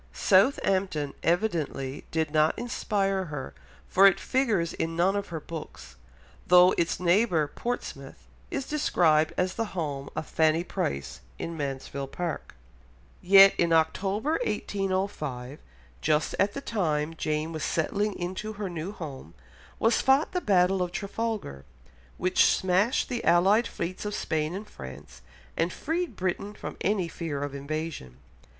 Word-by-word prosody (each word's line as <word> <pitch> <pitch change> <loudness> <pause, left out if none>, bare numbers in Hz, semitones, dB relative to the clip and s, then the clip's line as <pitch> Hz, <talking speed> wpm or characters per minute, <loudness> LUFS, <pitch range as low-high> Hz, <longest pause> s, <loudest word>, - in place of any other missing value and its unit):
Southampton 190 - +2
evidently 165 -7 -1
did 160 -2 -1
not 155 0 +3
inspire 195 -5 -1
her, 145 -5 -6 0.3
for 195 +1 +6
it 195 - +3
figures 220 -11 0
in 165 0 -3
none 180 +4 +2
of 200 0 -2
her 165 -2 -5
books, 150 - -9 0.5
though 180 +1 +7
its 170 -2 0
neighbour, 180 -2 +3
Portsmouth, 240 +11 -6 0.2
is 275 - -3
described 160 - +2
as 185 +1 +1
the 230 - -1
home 140 -4 -3
of - - -3
Fanny 160 +1 +2
Price 70 - -3 0.2
in 165 - -5
Mansfield 140 -1 -4
Park. 175 - -4 0.7
Yet 195 +1 +8
in 170 -1 +2
October 195 - +1
1805, 185 - -3 0.4
just 155 0 +1
at 200 +1 +2
the 275 - -4
time 165 - -1
Jane 155 0 -2
was 155 -2 -4
settling 205 +5 -1
into 185 +5 -4
her 200 -3 -5
new 170 +3 -4
home, 140 - -8 0.4
was 225 +1 +2
fought 270 +3 +3
the 360 - -1
Battle 190 - +3
of 180 -1 -1
Trafalgar, 200 - -4 0.5
which 185 +1 +3
smashed 190 +6 +2
the 245 -2 -3
allied 195 +7 +4
fleets 175 +2 -5
of 210 0 -2
Spain 155 +2 -1
and 210 +2 -6
France, 65 - -11 0.3
and 170 - 0
freed 325 - -3
Britain 190 +3 -3
from - - -7
any 195 -3 +1
fear 155 -4 -4
of 145 -1 -4
invasion. 140 - -5
175 Hz, 140 wpm, -27 LUFS, 155-200 Hz, 0.7 s, Yet